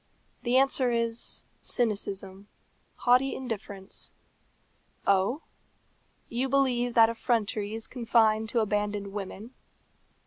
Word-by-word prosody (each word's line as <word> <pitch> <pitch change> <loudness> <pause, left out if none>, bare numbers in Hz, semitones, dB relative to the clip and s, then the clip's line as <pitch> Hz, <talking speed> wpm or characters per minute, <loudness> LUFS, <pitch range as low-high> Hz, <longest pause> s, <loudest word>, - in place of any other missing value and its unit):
The 245 +1 +2
answer 270 -1 +3
is, 230 0 -2 0.2
cynicism 200 -3 -2 0.5
haughty 250 +2 +3
indifference. 205 -6 -5 0.9
Oh! 200 +9 +2 0.8
you 250 +3 -1
believe 245 -3 +2
that 225 -1 +7
effrontery 220 -2 -1
is 225 - -1
confined 220 -3 +2
to 230 0 +2
abandoned 205 -1 -1
women? 205 +4 -6
225 Hz, 95 wpm, -28 LUFS, 205-245 Hz, 0.9 s, that